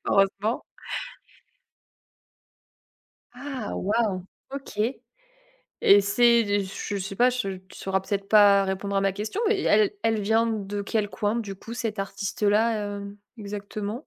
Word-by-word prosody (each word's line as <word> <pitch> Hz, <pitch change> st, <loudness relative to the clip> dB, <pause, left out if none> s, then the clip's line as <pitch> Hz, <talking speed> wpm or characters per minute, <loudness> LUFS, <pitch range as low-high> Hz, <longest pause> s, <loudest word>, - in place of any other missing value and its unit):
Heureusement. 200 Hz, +3 st, +1 dB, 2.7 s
Ah 260 Hz, -3 st, -5 dB
waouh! 205 Hz, -3 st, 0 dB, 0.3 s
OK 265 Hz, -6 st, -6 dB, 1.0 s
et 200 Hz, +1 st, +8 dB
c'est 235 Hz, +4 st, +4 dB
des 205 Hz, -1 st, 0 dB
ch 190 Hz, -, -7 dB
je -, -, 0 dB
sais 195 Hz, +1 st, -5 dB
pas, 245 Hz, +3 st, +5 dB
je 195 Hz, -7 st, -3 dB
tu 185 Hz, +1 st, -16 dB
sauras 190 Hz, 0 st, -1 dB
peut-être 200 Hz, 0 st, -3 dB
pas 205 Hz, -2 st, +7 dB
répondre 190 Hz, +1 st, -3 dB
à 195 Hz, -, +3 dB
ma 195 Hz, 0 st, +2 dB
question, 215 Hz, -, -4 dB
mais 415 Hz, -4 st, +1 dB
elle 210 Hz, -1 st, +4 dB
elle 225 Hz, -1 st, +2 dB
vient 220 Hz, +3 st, +2 dB
de 205 Hz, -2 st, -3 dB
quel 205 Hz, 0 st, -1 dB
coin, 210 Hz, +1 st, -1 dB
du 200 Hz, -4 st, -4 dB
coup, 230 Hz, +4 st, -9 dB
cette 220 Hz, -3 st, -3 dB
artiste-là, 205 Hz, +3 st, +1 dB, 0.3 s
hem, 200 Hz, 0 st, -8 dB, 0.2 s
exactement? 205 Hz, +3 st, -6 dB
205 Hz, 140 wpm, -26 LUFS, 195-225 Hz, 2.7 s, et